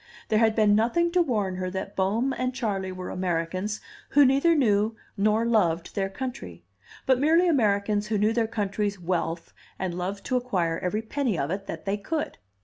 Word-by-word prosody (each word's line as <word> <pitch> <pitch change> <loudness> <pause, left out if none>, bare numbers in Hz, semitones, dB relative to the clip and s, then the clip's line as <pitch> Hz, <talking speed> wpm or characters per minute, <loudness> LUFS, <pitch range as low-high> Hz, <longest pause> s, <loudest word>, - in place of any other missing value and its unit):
There 215 - +3
had 220 -1 +3
been 215 -2 +4
nothing 240 +11 +2
to 360 0 +3
warn 210 - 0
her 185 0 -2
that 190 +2 -5
Bohm 220 +8 +1
and 255 0 -2
Charley 200 -7 -2
were 185 0 -6
Americans 185 +3 -2 0.3
who 290 0 +6
neither 275 +6 +4
knew 220 -5 +2 0.2
nor 215 +2 +2
loved 175 -8 +1
their 195 -1 -1
country, 145 - -6 0.4
but 260 -1 +3
merely 325 +5 +4
Americans 210 -7 +2
who 215 0 0
knew 210 +2 +2
their 230 -1 +1
country's 205 -2 -2
wealth 170 -1 -2 0.2
and 185 -2 -3
loved 190 +3 -4
to 255 - +1
acquire 180 -10 -1
every 210 +5 -2
penny 240 - -1
of 140 +2 -1
it 195 +1 -4
that - - -6
they 200 +1 0
could. 305 - -3
210 Hz, 185 wpm, -26 LUFS, 185-245 Hz, 0.4 s, who